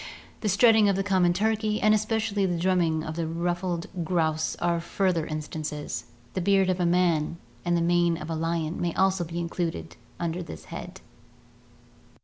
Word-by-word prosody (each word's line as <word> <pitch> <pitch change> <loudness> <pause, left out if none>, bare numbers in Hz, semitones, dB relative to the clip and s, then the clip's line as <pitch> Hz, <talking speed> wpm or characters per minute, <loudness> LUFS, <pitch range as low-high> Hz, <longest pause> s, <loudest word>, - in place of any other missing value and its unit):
The 215 - -1
strutting 220 +1 +5
of 195 - +2
the 195 - 0
common 185 -3 +3
turkey 215 +2 0
and 215 0 +4
especially 215 -2 +1
the 175 -1 -1
drumming 170 -3 +1
of 155 0 -5
the 165 -1 -2
ruffled 175 +1 -2 0.2
grouse 160 -2 0
are 170 -1 0
further 170 -2 0
instances. 155 -1 -4 0.3
The 185 - -1
beard 195 0 +3
of 185 - -2
man 170 -2 +2 0.3
and 175 0 +1
the - - +1
mane 175 -1 +3
of 155 - -7
the 165 - -1
lion 165 0 -2
may 170 -1 -1
also 190 -1 +2
be 170 0 -6
included 165 - -3 0.2
under 170 +1 -2
this 120 - -9
head. - - -8
175 Hz, 165 wpm, -27 LUFS, 165-190 Hz, 0.3 s, strutting